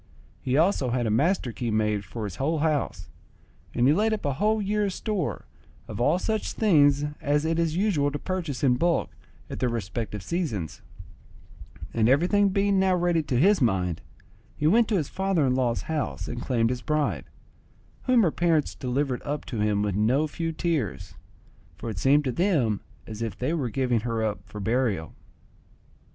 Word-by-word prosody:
He 130 Hz, +1 st, 0 dB
also 160 Hz, -6 st, +2 dB
had 120 Hz, 0 st, 0 dB
a 110 Hz, -, 0 dB
master 140 Hz, -, +1 dB
key 120 Hz, +1 st, -4 dB
made 105 Hz, -2 st, 0 dB
for 110 Hz, +4 st, -6 dB
his 100 Hz, -4 st, -5 dB
whole 155 Hz, +4 st, 0 dB
house; 145 Hz, -, -1 dB, 0.7 s
and 120 Hz, -, +3 dB
he 145 Hz, -, +5 dB
laid 215 Hz, +5 st, +2 dB
up 215 Hz, -, -4 dB
a 140 Hz, -, +1 dB
whole 215 Hz, +9 st, +1 dB
year's 205 Hz, -1 st, 0 dB
store 205 Hz, -8 st, -3 dB, 0.4 s
of -, -, -5 dB
all 145 Hz, -, +3 dB
such 220 Hz, +3 st, -2 dB
things 145 Hz, -9 st, +4 dB, 0.2 s
as 145 Hz, 0 st, +1 dB
it 165 Hz, +1 st, 0 dB
is 165 Hz, -1 st, 0 dB
usual 180 Hz, -7 st, +2 dB
to 145 Hz, -, -4 dB
purchase 165 Hz, -5 st, -4 dB
in 125 Hz, -3 st, +4 dB
bulk 170 Hz, +4 st, +1 dB, 0.4 s
at -, -, -7 dB
their 125 Hz, -, +1 dB
respective 105 Hz, -2 st, -4 dB
seasons; 115 Hz, -, -3 dB, 1.1 s
and 115 Hz, 0 st, +2 dB
everything 180 Hz, +9 st, +3 dB
being 195 Hz, 0 st, +2 dB
now 190 Hz, -1 st, +3 dB
ready 175 Hz, -2 st, +2 dB
to 135 Hz, -5 st, -1 dB
his 195 Hz, +3 st, +4 dB
mind, 90 Hz, -8 st, +1 dB, 0.6 s
he 150 Hz, -, -2 dB
went 220 Hz, +8 st, +4 dB
to 215 Hz, -, 0 dB
his 155 Hz, -5 st, -1 dB
father 190 Hz, -6 st, 0 dB
in 130 Hz, -, +2 dB
law's 125 Hz, -2 st, 0 dB
house 155 Hz, -2 st, -3 dB
and 120 Hz, 0 st, -5 dB
claimed 120 Hz, -3 st, +1 dB
his 125 Hz, -1 st, -3 dB
bride, 150 Hz, 0 st, -1 dB, 0.8 s
whom 250 Hz, -3 st, +4 dB
her 170 Hz, -, +3 dB
parents 165 Hz, -3 st, +1 dB
delivered 130 Hz, 0 st, -2 dB
up 145 Hz, 0 st, -4 dB
to 115 Hz, -, -5 dB
him 105 Hz, -1 st, +1 dB
with 105 Hz, -2 st, -1 dB
no 120 Hz, +9 st, +2 dB
few 165 Hz, +2 st, -3 dB
tears, 155 Hz, -, -2 dB, 0.6 s
for 115 Hz, -, -5 dB
it 95 Hz, -, -5 dB
seemed 145 Hz, +8 st, +4 dB
to 130 Hz, -, -1 dB
them 140 Hz, -, +1 dB, 0.2 s
as 110 Hz, 0 st, -8 dB
if 115 Hz, -1 st, -3 dB
they 130 Hz, +6 st, -1 dB
were 140 Hz, -8 st, -1 dB
giving 125 Hz, 0 st, +1 dB
her 115 Hz, 0 st, -2 dB
up 105 Hz, -1 st, -1 dB
for 105 Hz, -, -8 dB
burial. 110 Hz, -6 st, -1 dB
145 Hz, 185 wpm, -26 LUFS, 115-170 Hz, 1.1 s, he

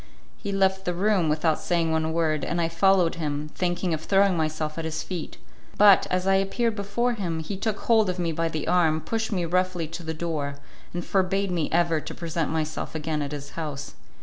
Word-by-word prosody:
He 200 Hz, -, -5 dB
left 190 Hz, 0 st, +1 dB
the 180 Hz, -, -1 dB
room 190 Hz, -3 st, +2 dB
without 155 Hz, +1 st, +1 dB
saying 170 Hz, -2 st, 0 dB
one 160 Hz, 0 st, 0 dB
word, 160 Hz, -3 st, 0 dB
and 170 Hz, -, -1 dB
I 165 Hz, -1 st, +1 dB
followed 180 Hz, 0 st, +3 dB
him, 150 Hz, 0 st, -3 dB
thinking 175 Hz, -1 st, -1 dB
of 155 Hz, -, -2 dB
throwing 195 Hz, +2 st, +3 dB
myself 155 Hz, -1 st, -2 dB
at -, -, -3 dB
his 160 Hz, 0 st, -3 dB
feet; 175 Hz, -4 st, -6 dB, 0.4 s
but, 205 Hz, -2 st, +7 dB
as 185 Hz, 0 st, 0 dB
I 195 Hz, 0 st, +4 dB
appeared 215 Hz, +4 st, 0 dB
before 215 Hz, +4 st, 0 dB
him, 175 Hz, -7 st, -3 dB
he 160 Hz, +5 st, -4 dB
took 205 Hz, +1 st, -2 dB
hold 220 Hz, -4 st, +3 dB
of 180 Hz, -, -2 dB
me 170 Hz, -2 st, 0 dB
by 165 Hz, +1 st, -1 dB
the 155 Hz, -2 st, -4 dB
arm, 165 Hz, -3 st, +3 dB
pushed 225 Hz, +4 st, -2 dB
me 180 Hz, -4 st, 0 dB
roughly 180 Hz, -1 st, 0 dB
to 165 Hz, +2 st, -6 dB
the 160 Hz, -1 st, -4 dB
door, 155 Hz, -4 st, -3 dB, 0.4 s
and 175 Hz, 0 st, -4 dB
forbade 195 Hz, 0 st, +1 dB
me 170 Hz, -4 st, 0 dB
ever 165 Hz, -2 st, +2 dB
to -, -, -7 dB
present 165 Hz, -2 st, -2 dB
myself 160 Hz, 0 st, -3 dB
again 155 Hz, -1 st, -2 dB
at 145 Hz, 0 st, -3 dB
his 145 Hz, -1 st, -6 dB
house. 150 Hz, -3 st, -5 dB
170 Hz, 210 wpm, -26 LUFS, 160-190 Hz, 0.4 s, but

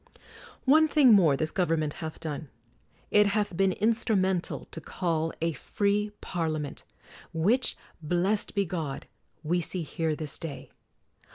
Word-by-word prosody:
One 310 Hz, +4 st, +6 dB
thing 280 Hz, -6 st, +6 dB
more 165 Hz, -9 st, +5 dB
this 155 Hz, +1 st, -1 dB
government 165 Hz, -5 st, 0 dB
hath 160 Hz, -1 st, -6 dB
done: 155 Hz, -2 st, -5 dB, 0.6 s
it 210 Hz, 0 st, +5 dB
hath 205 Hz, -2 st, 0 dB
been 190 Hz, +1 st, +2 dB
instrumental 200 Hz, -4 st, 0 dB
to 160 Hz, -, -7 dB
call 165 Hz, -1 st, -1 dB
a 165 Hz, 0 st, +1 dB
free 205 Hz, -, 0 dB
Parlia 160 Hz, -3 st, -2 dB
ment, 145 Hz, -2 st, -6 dB, 0.5 s
which, 210 Hz, +11 st, +2 dB, 0.2 s
blessed 180 Hz, +7 st, 0 dB
be 200 Hz, -1 st, +2 dB
God, 160 Hz, -6 st, -4 dB, 0.4 s
we 175 Hz, +3 st, +1 dB
see 175 Hz, +1 st, -3 dB
here 160 Hz, 0 st, -2 dB
this 150 Hz, -2 st, -4 dB
day! 160 Hz, -5 st, -7 dB
175 Hz, 135 wpm, -28 LUFS, 160-205 Hz, 0.6 s, One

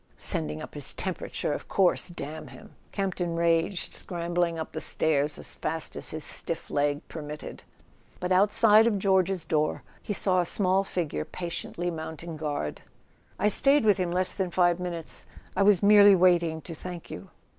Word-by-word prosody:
"Sending 75 Hz, 0 st, +1 dB
up -, -, -10 dB
his -, -, -2 dB
temperature, -, -, -2 dB
of -, -, -6 dB
course—damn 175 Hz, -4 st, 0 dB
him!" 215 Hz, -, -14 dB, 0.2 s
Campton 180 Hz, -4 st, -2 dB
raged, 170 Hz, +2 st, +1 dB
scrambling 175 Hz, -1 st, -2 dB
up 160 Hz, -, -5 dB
the 160 Hz, -, -5 dB
stairs 150 Hz, -1 st, +1 dB
as -, -, -7 dB
fast 160 Hz, +1 st, -4 dB
as -, -, -2 dB
his 155 Hz, -1 st, -4 dB
stiff 165 Hz, -, -2 dB
leg 145 Hz, +1 st, 0 dB
permitted. 150 Hz, -1 st, -8 dB, 0.6 s
But 180 Hz, +1 st, -3 dB
outside 210 Hz, +3 st, +5 dB
of 215 Hz, -3 st, +1 dB
George's 190 Hz, -2 st, +1 dB
door 155 Hz, -1 st, 0 dB, 0.2 s
he 205 Hz, -, -4 dB
saw 185 Hz, -2 st, +2 dB
a -, -, -2 dB
small 190 Hz, -1 st, +2 dB
figure 165 Hz, -, -3 dB
patiently 175 Hz, -, -4 dB
mounting 160 Hz, +1 st, -7 dB
guard. 145 Hz, -, -4 dB, 0.6 s
"I 205 Hz, -, +2 dB
stayed 275 Hz, +4 st, +3 dB
with 210 Hz, -2 st, +4 dB
him 180 Hz, -1 st, 0 dB
less 185 Hz, +1 st, 0 dB
than 190 Hz, -2 st, -2 dB
five 175 Hz, 0 st, +2 dB
minutes; 170 Hz, -3 st, -4 dB, 0.3 s
I -, -, +1 dB
was 200 Hz, -1 st, +4 dB
merely 205 Hz, -1 st, +8 dB
waiting 170 Hz, -3 st, +3 dB
to 165 Hz, -, -8 dB
thank 175 Hz, +1 st, -8 dB
you." 90 Hz, -, -8 dB
175 Hz, 165 wpm, -27 LUFS, 160-190 Hz, 0.6 s, merely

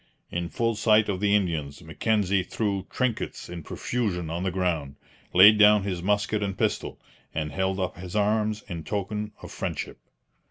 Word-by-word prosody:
In 85 Hz, 0 st, -2 dB
full 115 Hz, +6 st, 0 dB
sight 110 Hz, 0 st, +3 dB
of 95 Hz, -2 st, -1 dB
the 100 Hz, 0 st, +3 dB
Indians 80 Hz, -6 st, -1 dB
Mackenzie 100 Hz, +3 st, +1 dB
threw 100 Hz, 0 st, -2 dB
trinkets 125 Hz, -3 st, -2 dB
in 85 Hz, -1 st, -6 dB
profusion 90 Hz, -4 st, -3 dB
on 85 Hz, +1 st, -3 dB
the 95 Hz, -, 0 dB
ground, 85 Hz, -7 st, -1 dB, 0.4 s
laid 105 Hz, +4 st, +8 dB
down 105 Hz, -1 st, +7 dB
his 95 Hz, -3 st, -3 dB
musket 105 Hz, +2 st, +1 dB
and 100 Hz, -2 st, -2 dB
pistol, -, -, -1 dB, 0.4 s
and 75 Hz, -1 st, -2 dB
held 95 Hz, 0 st, -1 dB
up 90 Hz, -1 st, -2 dB
his 90 Hz, +1 st, -8 dB
arms 105 Hz, 0 st, +1 dB
in 85 Hz, -5 st, -5 dB
token 105 Hz, +2 st, -3 dB
of -, -, -8 dB
friendship. -, -, -4 dB
95 Hz, 165 wpm, -26 LUFS, 90-105 Hz, 0.4 s, laid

